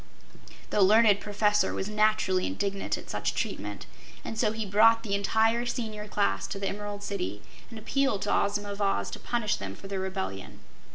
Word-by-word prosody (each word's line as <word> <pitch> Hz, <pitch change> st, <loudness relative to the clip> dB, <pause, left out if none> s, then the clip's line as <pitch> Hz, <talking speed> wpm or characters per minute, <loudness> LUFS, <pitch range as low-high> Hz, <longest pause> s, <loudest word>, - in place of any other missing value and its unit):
The 210 Hz, -, +2 dB
learned 210 Hz, +1 st, +6 dB
Professor 210 Hz, 0 st, +1 dB
was 190 Hz, -, -2 dB
naturally 210 Hz, -3 st, +2 dB
indignant 200 Hz, -1 st, -2 dB
at -, -, -10 dB
such -, -, -2 dB
treatment, -, -, -4 dB, 0.4 s
and -, -, -4 dB
so 215 Hz, -1 st, +1 dB
he 220 Hz, 0 st, -3 dB
brought 220 Hz, +3 st, +5 dB
the 205 Hz, -3 st, -3 dB
entire 220 Hz, +4 st, +2 dB
Senior 215 Hz, -3 st, -4 dB
Class 95 Hz, -, 0 dB
to -, -, -5 dB
the 195 Hz, 0 st, -2 dB
Emerald 205 Hz, 0 st, -5 dB
City 105 Hz, -, -4 dB, 0.3 s
and 230 Hz, -, -9 dB
appealed 225 Hz, -1 st, 0 dB
to 205 Hz, -, 0 dB
Ozma 205 Hz, 0 st, 0 dB
of 200 Hz, +1 st, -6 dB
Oz 195 Hz, -1 st, 0 dB
to -, -, -6 dB
punish 235 Hz, -4 st, -1 dB
them 100 Hz, 0 st, -6 dB
for 195 Hz, -, -11 dB
their 195 Hz, -1 st, -3 dB
rebellion. 95 Hz, -, -5 dB
205 Hz, 180 wpm, -28 LUFS, 195-215 Hz, 0.4 s, learned